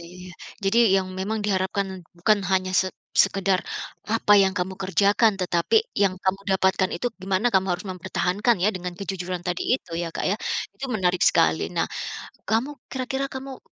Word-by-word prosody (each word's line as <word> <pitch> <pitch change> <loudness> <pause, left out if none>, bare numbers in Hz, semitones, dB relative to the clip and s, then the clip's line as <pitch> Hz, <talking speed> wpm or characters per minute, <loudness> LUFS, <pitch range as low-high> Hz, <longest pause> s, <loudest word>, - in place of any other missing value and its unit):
iya 180 0 -11
iya. - - -11 0.3
Jadi 195 +4 +3 0.2
yang 190 -1 0
memang 200 +4 -2
diharapkan 190 -1 -1 0.2
bukan 210 +4 +3
hanya 185 -1 +1
se 185 - +3 0.3
sekedar 195 -1 +3 0.5
apa 220 -1 +2
yang 190 -1 +3
kamu 185 +1 -2
kerjakan 200 +3 +3
tetapi 180 - +2 0.2
yang 195 -2 +3
kamu 190 +1 0
dapatkan 190 0 +2
itu 175 - -2 0.2
gimana 190 +4 0
kamu 190 0 +3
harus 180 +3 -8
mempertahankan 190 +4 0
ya 210 - +4
dengan 180 -1 -5
kejujuran 185 -2 -4
tadi 180 -1 -1 0.2
itu 170 - -16
ya 170 -1 -3
Kak - - -2
ya. 200 - +1 0.4
Itu 270 - -5
menarik 185 -5 +1
sekali. - - +3
Nah, - - +1 0.6
kamu 230 +6 +1 0.2
kira-kira 265 +1 -2
kamu 265 0 -7
190 Hz, 165 wpm, -24 LUFS, 185-210 Hz, 0.6 s, ya